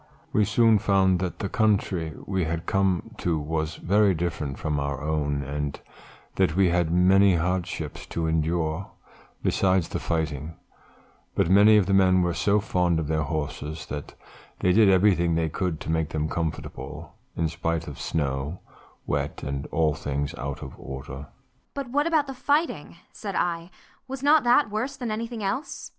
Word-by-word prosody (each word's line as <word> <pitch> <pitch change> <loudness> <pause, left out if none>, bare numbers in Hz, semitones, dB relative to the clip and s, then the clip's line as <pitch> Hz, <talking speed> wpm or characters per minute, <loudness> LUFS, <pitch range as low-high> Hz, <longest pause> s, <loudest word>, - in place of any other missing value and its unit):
"We 105 - +4
soon 110 +1 +4
found 95 -3 +3
that 90 -1 -3
the 100 - -3
country 95 -7 +1
we 95 -3 -1
had 85 +1 -3
come 95 -2 0
to 85 -2 0
was 80 +1 -2
very 100 0 +3
different 80 -4 -3
from 75 -2 -1
our 70 -2 -2
own 75 -1 -1
and 70 +1 -4 0.6
that 75 - +2
we 95 -1 +4
had 85 -1 +1
many 95 +2 +5
hardships 90 +2 -2
to 85 - -2
endure 80 +2 0 0.5
besides 95 -2 +2
the - - -3
fighting; 80 -1 -2 0.8
but 85 - +2
many 105 +2 +7
of 100 - +4
the 100 - 0
men 95 -1 +5
were 85 -1 0
so 100 +4 +2
fond 90 -4 +1
of 80 - -2
their 80 0 +1
horses 75 0 -4
that 75 -1 -6 0.5
they 90 - +3
did 105 0 +6
everything 90 -3 +4
they 80 -1 +1
could 85 0 -2
to - - -3
make 80 -1 0
them 80 -2 -1
comfortable 75 -2 -5 0.2
in 80 - +1
spite 80 +1 -2
of 75 - -8
snow, 70 +2 -2 0.5
wet, - - -2
and 70 0 -3
all 80 -2 +1
things 70 0 -3
out 70 +2 -5
of - - -8
order." 70 +1 -7 0.5
"But 275 -4 -5
what 290 +4 +2
about 315 -3 +3
the 270 - -6
fighting?" 290 +5 0 0.2
said 200 -3 -6
I, 170 0 -1 0.4
"was 270 0 -6
not 295 0 +5
that 240 -1 +4
worse 250 +6 -2
than 240 -3 -3
anything 225 0 -4
else?" 200 +9 -3
85 Hz, 170 wpm, -26 LUFS, 80-100 Hz, 0.8 s, many